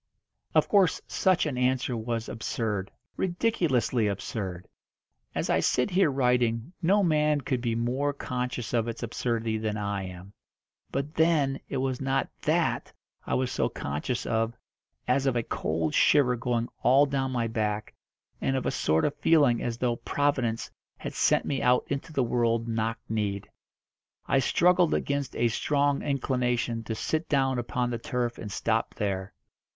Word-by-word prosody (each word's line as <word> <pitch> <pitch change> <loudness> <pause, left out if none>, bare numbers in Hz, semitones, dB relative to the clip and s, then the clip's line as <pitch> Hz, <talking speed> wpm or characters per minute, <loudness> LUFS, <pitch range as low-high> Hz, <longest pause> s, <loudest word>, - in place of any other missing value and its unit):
Of - - +4
course 195 -4 +4
such 185 -4 +2
an 135 -5 -2
answer 125 0 +1
was 115 0 -3
absurd 105 -3 -3 0.3
ridiculously 170 - +1
absurd. 95 -2 -4 0.7
As - - -1
I - - +2
sit 125 +10 +1
here 185 -2 +4
writing 125 0 +1
no 200 +4 +3
man 150 -3 +2
could 125 -1 -1
be 115 -2 0
more 125 +5 0
conscious 125 -4 -4
of 115 -1 +1
its 115 +1 -5
absurdity 115 -1 -1
than 110 -1 -2
I 100 -2 -2
am. 90 +2 -11 0.6
But 140 +3 -3
then 155 -4 +2
it 140 - -2
was 130 -1 -1
not 135 0 0
that - - 0 0.4
I - - +1
was 130 -1 0
so - - 0
conscious 75 - -3
of 115 +1 0 0.5
as 140 0 +2
of 130 - +2
a 120 - +1
cold 80 -4 -2
shiver 125 -4 +4
going 120 0 -1
all 135 +4 +5
down 135 -1 -1
my 120 -2 0
back, 110 -2 -2 0.5
and 135 - +1
of 130 - -1
a - - +1
sort 80 +1 +1
of 145 - 0
feeling 145 -6 +4
as 115 -1 -2
though 120 -1 0
Providence 130 -6 -1 0.3
had - - -6
sent - - +2
me 135 - -1
out 125 0 +3
into 140 +3 -3
the 140 -4 +1
world 115 -1 +1
knock 115 0 -1
kneed. 105 -3 -2 0.8
I 135 - +3
struggled 175 +5 +3
against 140 -2 -2
a 120 - +2
strong 140 +4 +1
inclination 125 -4 0
to 110 - -3
sit 155 +8 -2
down 135 -3 +2
upon 125 0 -1
the 120 - -3
turf 120 0 -2
and 105 - -6
stop - - -1
there. 95 -2 -2
125 Hz, 160 wpm, -28 LUFS, 115-140 Hz, 0.8 s, all